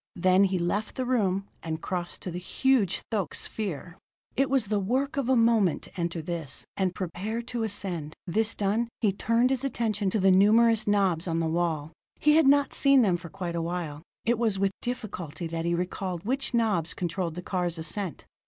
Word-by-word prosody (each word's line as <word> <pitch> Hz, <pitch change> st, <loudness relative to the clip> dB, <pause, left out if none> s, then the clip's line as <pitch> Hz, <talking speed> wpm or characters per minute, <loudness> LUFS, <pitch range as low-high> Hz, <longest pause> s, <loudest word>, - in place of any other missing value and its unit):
Then 185 Hz, +2 st, +4 dB
he 190 Hz, -1 st, 0 dB
left 190 Hz, +5 st, -1 dB
the 255 Hz, -, -2 dB
room, 200 Hz, -6 st, +1 dB
and 160 Hz, -1 st, -4 dB
crossed 175 Hz, 0 st, -4 dB
to 180 Hz, -, -3 dB
the 175 Hz, -, -4 dB
huge 210 Hz, 0 st, +1 dB
thoque 200 Hz, -8 st, -1 dB
sphere. 180 Hz, -4 st, -3 dB, 0.4 s
It 270 Hz, +1 st, +2 dB
was 265 Hz, -4 st, +2 dB
the 205 Hz, 0 st, 0 dB
work 260 Hz, +9 st, 0 dB
of 275 Hz, -3 st, -1 dB
a 260 Hz, -, +5 dB
moment 225 Hz, -7 st, +3 dB
to -, -, -11 dB
enter 170 Hz, -1 st, -2 dB
this, 160 Hz, -5 st, -4 dB
and 185 Hz, -2 st, 0 dB
prepare 200 Hz, +6 st, -3 dB
to 240 Hz, 0 st, -4 dB
ascend. 185 Hz, -8 st, -3 dB
This 215 Hz, +5 st, 0 dB
done, 215 Hz, +4 st, 0 dB
he 210 Hz, -4 st, +3 dB
turned 230 Hz, +5 st, +2 dB
his 265 Hz, -1 st, 0 dB
attention 220 Hz, -7 st, 0 dB
to 215 Hz, -, 0 dB
the 190 Hz, 0 st, +5 dB
numerous 220 Hz, +3 st, +5 dB
knobs 190 Hz, -5 st, +2 dB
on 165 Hz, -1 st, 0 dB
the 165 Hz, -, 0 dB
wall. 160 Hz, -2 st, -1 dB, 0.3 s
He 300 Hz, 0 st, +4 dB
had 320 Hz, -4 st, +5 dB
not 285 Hz, 0 st, +4 dB
seen 275 Hz, -2 st, +5 dB
them 190 Hz, -5 st, +3 dB
for 170 Hz, -1 st, -7 dB
quite 180 Hz, -2 st, -5 dB
a 170 Hz, -, -1 dB
while; 165 Hz, -3 st, -4 dB, 0.2 s
it 235 Hz, -1 st, +2 dB
was 220 Hz, -4 st, +1 dB
with 195 Hz, 0 st, +1 dB
difficulty 185 Hz, -, -5 dB
that 165 Hz, 0 st, -3 dB
he 170 Hz, 0 st, +1 dB
recalled 180 Hz, 0 st, -3 dB
which 265 Hz, +4 st, -1 dB
knobs 215 Hz, -9 st, +1 dB
controlled 175 Hz, -1 st, -2 dB
the 180 Hz, -, -6 dB
car's 180 Hz, -3 st, -1 dB
ascent. 165 Hz, +3 st, -4 dB
195 Hz, 200 wpm, -27 LUFS, 175-230 Hz, 0.4 s, a